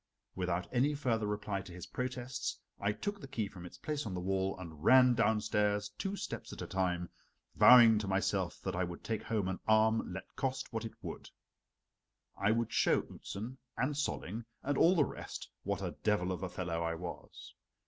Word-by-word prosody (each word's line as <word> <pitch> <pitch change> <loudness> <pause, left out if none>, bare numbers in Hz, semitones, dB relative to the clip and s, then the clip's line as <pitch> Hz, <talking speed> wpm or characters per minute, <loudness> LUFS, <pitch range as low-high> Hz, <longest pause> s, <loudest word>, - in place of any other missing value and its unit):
Without 90 -1 -1
any 140 +4 +3
further 115 -6 0
reply 105 -1 -2
to 95 - -11
his 90 0 -8
protests 125 +2 -3 0.2
I 100 +1 +1
took 200 - -4
the - - -8
key 115 -6 -2
from 90 -2 -9
its 90 - -13
place 150 +8 -3
on 95 - -4
the - - -2
wall 95 +1 0
and 80 -4 -9
ran 125 -1 +7
downstairs 105 -2 +2
two 195 - -4
steps - - -5
at - - -6
a - - -4
time, 90 -2 -1 0.5
vowing 115 -4 +8
to 105 - -3
myself 95 -1 0
that 95 -1 -2
I 90 - +1
would 85 -1 -6
take 110 -2 -2
home 110 -5 -1
an 95 0 -2
arm 110 -1 +4
let 95 +1 -8
cost 130 -2 -2
what 115 0 -2
it 110 - -6
would. - - -7 1.1
I 100 - +1
would 115 +1 +1
show - - +3
Outzen, 120 +7 -7 0.2
and 135 +4 +1
Solling, 120 -5 -3 0.2
and 145 +1 0
all 170 +6 +5
the 150 -5 +4
rest, - - -7
what - - -2
a - - -2
devil 105 -4 +1
of 90 - -3
a 95 - -3
fellow 85 -2 -3
I 85 0 -1
was. 85 +1 -8
105 Hz, 195 wpm, -34 LUFS, 95-125 Hz, 1.1 s, vowing